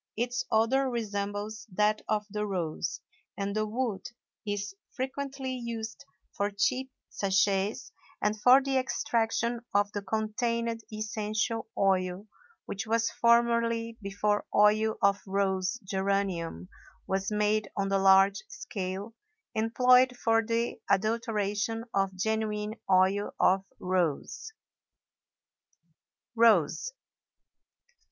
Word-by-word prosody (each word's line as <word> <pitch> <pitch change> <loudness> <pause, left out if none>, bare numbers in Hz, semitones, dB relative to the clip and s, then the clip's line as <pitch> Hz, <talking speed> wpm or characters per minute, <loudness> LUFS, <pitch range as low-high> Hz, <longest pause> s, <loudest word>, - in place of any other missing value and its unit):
Its 245 +2 -1
odor 245 +4 +2
resembles 210 -2 -4
that 210 +3 +2
of 210 -1 0
the 210 0 -2
rose, 170 -4 -3 0.4
and 200 0 -2
the 215 0 0
wood 225 -2 -3 0.4
is 205 -1 -3 0.2
frequently 265 0 -4
used 235 +1 -6 0.3
for 200 0 0
cheap 255 +6 0 0.2
sachets 195 +1 0 0.3
and 210 0 -1
for 255 +3 +7
the 270 -1 0
extraction 235 -2 0 0.2
of 205 0 +3
the 205 - -3
contained 225 +3 -1
essential 215 +1 -2
oil 185 0 +1 0.4
which 200 +3 -5
was 225 +1 +1
formerly 235 -1 +2
(before 205 +1 0
oil 215 +1 +4
of 200 0 +3
rose 190 +2 0
geranium 190 - -1 0.4
was 195 +1 -1
made 210 0 +1
on 195 -1 0
the 195 0 +2
large 195 +1 +5
scale) 200 -2 -5 0.4
employed 250 +3 +4
for 225 -1 +2
the 230 +1 -1
adulteration 220 +1 0
of 195 -1 +1
genuine 215 +1 -1 0.2
oil 190 +2 +3
of 190 +1 +4 0.2
rose. 180 - -1 1.8
ROSE. 230 - +3
210 Hz, 105 wpm, -29 LUFS, 195-230 Hz, 1.8 s, for